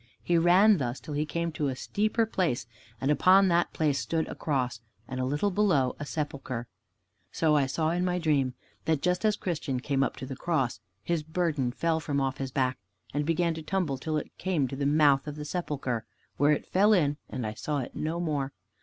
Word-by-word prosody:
He 175 - +1
ran 180 +4 +6
thus 125 -1 -2
till 155 - -7
he 150 +1 -1
came 170 +2 -2
to 155 -2 -1
a 130 - -2
steeper 215 - 0
place, 180 - -1 0.3
and 135 +2 +1
upon 185 +6 +5
that 170 0 +2
place 145 -3 +1
stood 160 -1 -1
a - - -4
Cross, 125 -6 -1 0.3
and 130 -1 -5
a 130 - 0
little 145 +10 0
below, 175 -11 +2
a 145 - -5
Sepulcher. 140 -6 -4 0.7
So 155 -2 +2
I 140 -2 +3
saw 155 +4 0
in 175 +1 0
my 180 0 +1
dream 145 -6 +1 0.3
that 155 -2 +1
just 180 +1 +1
as 215 -1 +3
Christian 150 -9 -2
came 135 +1 0
up 135 - 0
to - - -7
the 135 0 -6
Cross 135 -5 -1 0.2
his 170 -2 0
burden 155 -5 -1
fell 160 +5 0
from 145 -3 -1
off 135 -1 -1
his 135 -1 -2
back, 130 -1 0 0.3
and 145 +1 -1
began 165 0 +2
to 160 - -6
tumble 155 -5 -1
till 155 +2 -1
it 150 - -5
came 170 -8 +1
to 135 - -5
the 140 +1 0
mouth 145 -1 +4
of 150 - -4
the 150 0 -6
Sepulcher, 140 -8 -2 0.3
where 145 +2 +4
it 150 - 0
fell 205 +3 +4
in 150 -7 +2
and 125 -3 -4
I 105 - -3
saw 145 +7 -3
it 130 - -5
no 160 +2 -2
more. 145 -5 -1
150 Hz, 215 wpm, -28 LUFS, 135-170 Hz, 0.7 s, ran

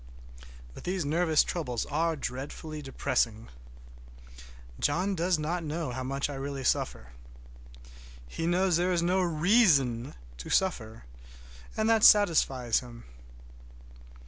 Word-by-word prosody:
But - - -11
these 180 -3 -2
nervous 160 +1 +2
troubles 125 -10 -3
are 160 +3 -1
dreadfully 145 +3 -6
depressing. 125 -5 -2 1.3
John 180 +7 0
does 180 0 +1
not 165 +3 -3
know 155 -2 -4
how 130 +1 -5
much 135 +2 -2
I 145 - -6
really 135 0 -5
suffer. 65 - -1 1.2
He 165 - -4
knows 180 0 +2
there 180 +1 +1
is 170 -1 +1
no 185 +2 +1
reason 155 - +2 0.2
to - - -9
suffer, 115 -13 -1 0.7
and 220 - +1
that 225 -1 +3
satisfies 135 - +4
him. 120 -2 -12
155 Hz, 120 wpm, -28 LUFS, 130-175 Hz, 1.3 s, satisfies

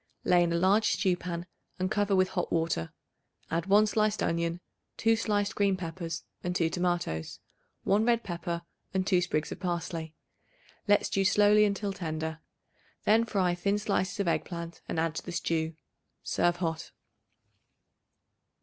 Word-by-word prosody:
Lay 180 -1 +4
in 170 -1 +2
a - - +1
large 195 +5 +3
stew 185 -3 +2
pan 175 -1 -5 0.3
and 185 0 -1
cover 205 -1 +2
with 185 0 +3
hot 180 - -2
water. 160 - 0 0.6
Add 165 +2 -1
1 205 +2 +6
sliced 215 0 +1
onion, 170 +1 0 0.4
2 225 0 +3
sliced 205 -2 0
green 200 -2 +2
peppers 165 -2 -5 0.2
and 180 0 -2
2 165 -2 +1
tomatoes, 175 - -2 0.4
1 205 +2 +3
red 235 0 +2
pepper 170 -1 -4 0.3
and 190 0 +1
2 185 -3 +3
sprigs 155 -3 -1
of - - -6
parsley. 170 -3 -3 0.7
Let 205 0 +4
stew 195 - +1
slowly 210 +1 +5
until 200 -1 -1
tender. 160 -3 -4 0.6
Then 225 +2 +4
fry 190 -5 +1
thin 200 +3 0
slices 200 -2 -1
of 200 - 0
egg 165 - +1
plant 170 -2 -7
and - - -1
add 165 -1 0
to - - -4
the 175 - -6
stew. 165 -2 -1 0.5
Serve 175 0 +1
hot. 165 -2 -3
180 Hz, 160 wpm, -29 LUFS, 170-200 Hz, 0.7 s, 1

